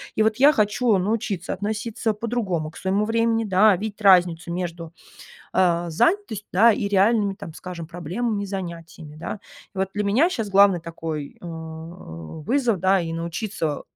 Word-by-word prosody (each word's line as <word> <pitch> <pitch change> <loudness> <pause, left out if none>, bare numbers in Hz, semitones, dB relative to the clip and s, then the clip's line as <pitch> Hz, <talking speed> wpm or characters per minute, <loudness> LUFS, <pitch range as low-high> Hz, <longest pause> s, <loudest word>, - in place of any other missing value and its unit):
И 215 - +3
вот 220 0 +2
я 285 +3 +7
хочу 215 -1 +2
научиться 200 -1 -2
относиться 220 +2 -2
по-другому 210 -8 -2
к - - -14
своему 195 +3 0
времени, 225 0 +1
да, 200 +1 +5
видеть 215 +1 -6
разницу 175 -3 +4
между, 170 -2 -5 0.6
э, 175 -2 +2
занятостью, 275 - 0
да, 225 +4 +6
и 200 0 -2
реальными, 200 0 +3
там 165 -5 -9
скажем, 175 -3 -7
проблемами 200 +6 -3
и - - -6
занятиями, 170 -5 -7
да. 195 +5 -6 0.3
И - - -8
вот 190 0 0
для 205 0 -1
меня 260 - +3
щас 225 - -3
главный 195 -3 +5
такой, 160 -3 -6
э, - - -14
вызов, 160 - -4
да, 190 +1 +3
и 165 -1 -4
научиться 165 -1 -3
195 Hz, 160 wpm, -23 LUFS, 170-220 Hz, 0.6 s, я